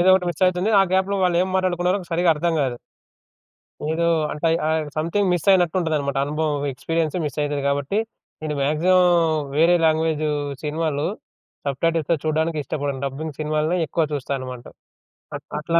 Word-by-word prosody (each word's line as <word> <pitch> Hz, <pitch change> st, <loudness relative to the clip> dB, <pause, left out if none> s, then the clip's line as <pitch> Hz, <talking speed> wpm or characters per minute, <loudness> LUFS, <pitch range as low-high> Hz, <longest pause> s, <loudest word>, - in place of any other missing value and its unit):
ఏదో 180 Hz, -, +4 dB
ఒకటి 180 Hz, -1 st, +1 dB
మిస్ 175 Hz, -, -5 dB
అయితుంది. 185 Hz, +4 st, -1 dB
ఆ -, -, +6 dB
గ్యాప్‌లో 195 Hz, +1 st, +1 dB
వాళ్ళేం 180 Hz, +1 st, +2 dB
మాట్లాడుకున్నారో 185 Hz, +1 st, +1 dB
సరిగ్గా 170 Hz, 0 st, +4 dB
అర్థం 170 Hz, +2 st, 0 dB
కాదు. 125 Hz, -2 st, -1 dB, 1.2 s
ఏదో 170 Hz, +1 st, 0 dB, 0.3 s
అంటే 165 Hz, +2 st, -1 dB, 0.2 s
ఆహ్, 160 Hz, 0 st, +1 dB
స‌‌మ్‌థింగ్ 175 Hz, +5 st, 0 dB
మిస్ 175 Hz, 0 st, -1 dB
అయినట్టుంటదన్నమాట. 160 Hz, -6 st, +1 dB
అనుభవం 150 Hz, -1 st, -1 dB
ఎక్స్పీరియన్స్ 165 Hz, +4 st, -2 dB
మిస్సయితది 145 Hz, -1 st, -2 dB
కాబట్టి, 140 Hz, +8 st, 0 dB, 0.4 s
నేను 155 Hz, -1 st, -2 dB
మాక్సిమం 175 Hz, +6 st, +3 dB, 0.5 s
వేరే 170 Hz, +3 st, +5 dB
లాంగ్వేజ్ 160 Hz, -1 st, +1 dB, 0.4 s
సినిమాలు 150 Hz, -1 st, -1 dB, 0.6 s
సబ్‌టైటిల్స్‌తో 165 Hz, +3 st, 0 dB
చూడడానికిష్టపడను. 150 Hz, -3 st, -1 dB
డబ్బింగ్ 145 Hz, +2 st, -5 dB
సినిమాలనే 155 Hz, +3 st, 0 dB
ఎక్కువ 160 Hz, +3 st, 0 dB
చూస్తాననమాట. 130 Hz, -3 st, -4 dB, 1.0 s
అట్లా 170 Hz, +2 st, +1 dB
160 Hz, 125 wpm, -22 LUFS, 145-175 Hz, 1.2 s, ఆ